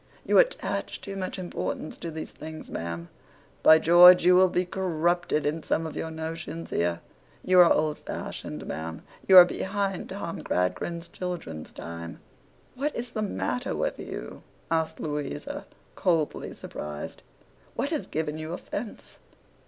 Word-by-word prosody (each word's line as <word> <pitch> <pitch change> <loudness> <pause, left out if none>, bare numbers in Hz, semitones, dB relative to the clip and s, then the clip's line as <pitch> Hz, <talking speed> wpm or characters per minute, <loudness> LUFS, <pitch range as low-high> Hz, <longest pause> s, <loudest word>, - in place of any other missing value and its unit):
'You - - +5
attach - - 0
too 195 - -7
much 190 0 -4
importance 175 -3 -4
to 170 - -5
these 160 0 -6
things, 155 +1 -9
ma'am. 85 0 -4 0.5
By 160 - +8
George, 175 +2 +8
you'll 180 +1 +6
be 180 +1 0
corrupted 175 -3 0
in 155 +2 0
some 165 - 0
of 160 - -6
your 160 - -3
notions 160 +1 -6
here. 85 0 0 0.4
You 185 0 +5
are 175 -1 +8
old 155 -1 +2
fashioned, 75 - -6
ma'am. 80 +1 -5 0.2
You 190 - +9
are 180 - +13
behind 195 +1 -2
Tom 190 -3 -5
Gradgrind's 170 - -1
children's 170 - -6
time.' 85 0 -8 0.5
'What 285 +4 -2
is 240 0 -4
the 220 - -3
matter 215 +4 -2
with - - -2
you?' - - -7 0.3
asked 160 -1 0
Louisa, 150 -2 -4 0.3
coldly 165 -5 0
surprised. 75 0 -7 0.5
'What 285 - -1
has 310 - -2
given 155 0 -3
you 155 +2 -5
offence? 205 +4 -7
165 Hz, 145 wpm, -27 LUFS, 155-185 Hz, 0.5 s, are